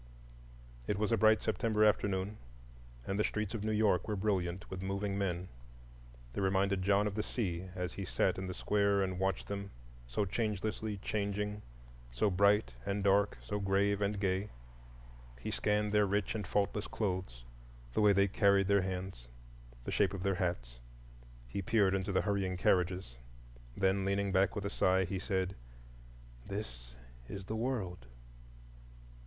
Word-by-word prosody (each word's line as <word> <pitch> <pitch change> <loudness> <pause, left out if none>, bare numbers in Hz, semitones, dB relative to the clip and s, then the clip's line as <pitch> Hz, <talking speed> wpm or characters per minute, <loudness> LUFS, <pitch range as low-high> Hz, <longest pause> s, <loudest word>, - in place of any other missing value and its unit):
It 105 - 0
was 105 +2 0
a - - +5
bright 110 -1 +4
September 110 -1 +2
afternoon, 100 -1 +1 0.7
and 100 +1 -2
the - - +4
streets 105 -1 -2
of 110 -3 -3
New 110 - 0
York 105 -4 +2
were 105 - -1
brilliant 95 -3 -1
with 95 -1 -6
moving 100 +1 -2
men. 90 -2 -1 0.9
They - - -2
reminded 95 0 +2
John 100 +2 +3
of 105 - -1
the 105 - -1
sea, 95 -6 -3
as 90 0 -3
he 100 - -5
sat 95 0 +1
in 95 - -4
the 90 - -5
square 100 -1 +2
and 95 -1 -2
watched 95 0 -1
them, 100 0 -4 0.4
so 65 +12 0
changelessly 105 +1 -2
changing, 105 0 -2 0.5
so 80 - +1
bright 100 -8 +3
and 100 +4 -2
dark, 100 +1 +3
so 105 - -3
grave 100 +1 +2
and 100 0 0
gay. 95 +1 0 0.9
He - - -4
scanned 105 0 +1
their 105 -1 +4
rich 100 -1 0
and 105 -4 -4
faultless 105 +1 0
clothes, 90 - -3 0.5
the - - +2
way 105 -1 +6
they 100 0 +4
carried 100 -1 +3
their 100 -1 +5
hands, 90 -8 -5 0.6
the - - -4
shape 100 -1 +2
of 95 - -5
their 100 -1 +2
hats; - - -2 0.7
he 80 +11 -3
peered 100 -2 +3
into 95 +1 -1
the 95 - +2
hurrying 100 -3 -1
carriages. 90 -8 +1 0.6
Then, 95 0 +2
leaning 100 0 0
back 95 -1 +3
with 100 - -3
a 100 - -2
sigh, 95 -1 +3
he 95 +1 -3
said, 95 0 -1 0.9
"This - - -6 0.3
is 95 -1 -6
the 110 - -3
World." 110 - -3
100 Hz, 160 wpm, -33 LUFS, 95-105 Hz, 0.9 s, way